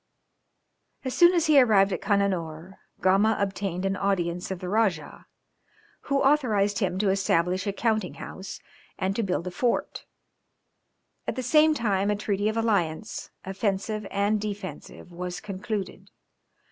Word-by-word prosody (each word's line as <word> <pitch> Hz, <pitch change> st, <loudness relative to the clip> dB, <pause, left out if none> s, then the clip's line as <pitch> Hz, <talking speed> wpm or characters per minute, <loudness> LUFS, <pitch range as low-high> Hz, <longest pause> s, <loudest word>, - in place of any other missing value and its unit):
] -, -, -39 dB
As 260 Hz, -, -2 dB
soon 350 Hz, +1 st, +6 dB
as 335 Hz, -, +2 dB
he 295 Hz, -3 st, +6 dB
arrived 200 Hz, -5 st, +4 dB
at -, -, -3 dB
Cananore, 190 Hz, -4 st, -1 dB, 0.2 s
Gama 195 Hz, +4 st, +3 dB
obtained 195 Hz, -2 st, -2 dB
an 195 Hz, 0 st, 0 dB
audience 180 Hz, -3 st, -1 dB
of 190 Hz, -, -3 dB
the 180 Hz, -, -7 dB
Rajah, 190 Hz, -7 st, -1 dB, 0.8 s
who 275 Hz, 0 st, +2 dB
authorized 220 Hz, -8 st, +2 dB
him 185 Hz, -4 st, -1 dB
to 195 Hz, 0 st, +2 dB
establish 185 Hz, 0 st, +1 dB
a -, -, +1 dB
counting 215 Hz, -2 st, -1 dB
house, 190 Hz, +1 st, -8 dB, 0.4 s
and 190 Hz, +1 st, -1 dB
to 230 Hz, -, 0 dB
build 185 Hz, -4 st, -1 dB
a 180 Hz, -, -4 dB
fort. 240 Hz, +7 st, -1 dB, 1.2 s
At -, -, -2 dB
the 255 Hz, -, -3 dB
same 310 Hz, +3 st, +4 dB
time 200 Hz, -5 st, 0 dB
a 210 Hz, -, +2 dB
treaty 205 Hz, 0 st, -1 dB
of 220 Hz, -, -3 dB
alliance, 210 Hz, -4 st, -1 dB, 0.2 s
offensive 200 Hz, +2 st, -2 dB
and 205 Hz, +1 st, +1 dB
defensive 200 Hz, -3 st, -7 dB
was 180 Hz, +1 st, -5 dB
concluded. 200 Hz, 0 st, -5 dB
200 Hz, 145 wpm, -26 LUFS, 185-220 Hz, 1.2 s, soon